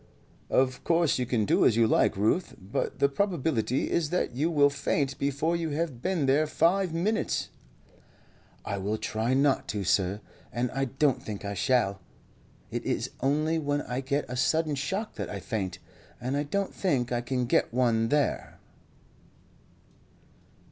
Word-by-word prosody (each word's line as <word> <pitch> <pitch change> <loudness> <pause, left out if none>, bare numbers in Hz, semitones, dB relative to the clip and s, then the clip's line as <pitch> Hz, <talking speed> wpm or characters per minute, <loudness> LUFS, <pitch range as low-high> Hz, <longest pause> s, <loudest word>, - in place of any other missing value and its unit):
"Of 130 -1 +1
course 165 -5 +2
you 125 - -1
can 115 -4 +1
do - - +3
as 110 - +5
you 115 0 +4
like, 110 - +2
Ruth; 110 - +1
but 95 +3 -3
the 140 - +4
probability 140 - 0
is 160 -3 +1
that 180 -6 -1
you 150 +6 +1
will 145 -3 +4
faint 140 -1 -1
before 140 +4 0
you 165 -1 -2
have 155 -8 -2
been 180 -4 0
there 145 +4 +3
five 180 +4 +2
minutes." 190 +7 -1 1.2
"I 100 -2 -3
will 105 +3 -1
try 110 +4 -1
not 140 0 +2
to, 105 -2 -2
sir, 95 +2 +1 0.3
and 120 +1 -1
I 135 0 -1
don't 135 +1 +1
think 105 -2 -6
I 100 - -3
shall. 100 -3 +1 0.7
It - - -3
is - - -2
only 155 +4 +1
when 145 -1 -1
I 125 +2 -3
get 140 +2 -1
a 125 - -5
sudden 155 +4 +1
shock 190 +11 -3
that - - -4
I - - -5
faint, 105 -7 -3 0.4
and 130 +3 -2
I 145 +1 0
don't 200 +6 -2
think 130 -11 0
I 120 -1 0
can 125 0 -1
get - - +2
one 115 -2 +2
there." 145 -2 0
135 Hz, 165 wpm, -28 LUFS, 120-155 Hz, 1.2 s, as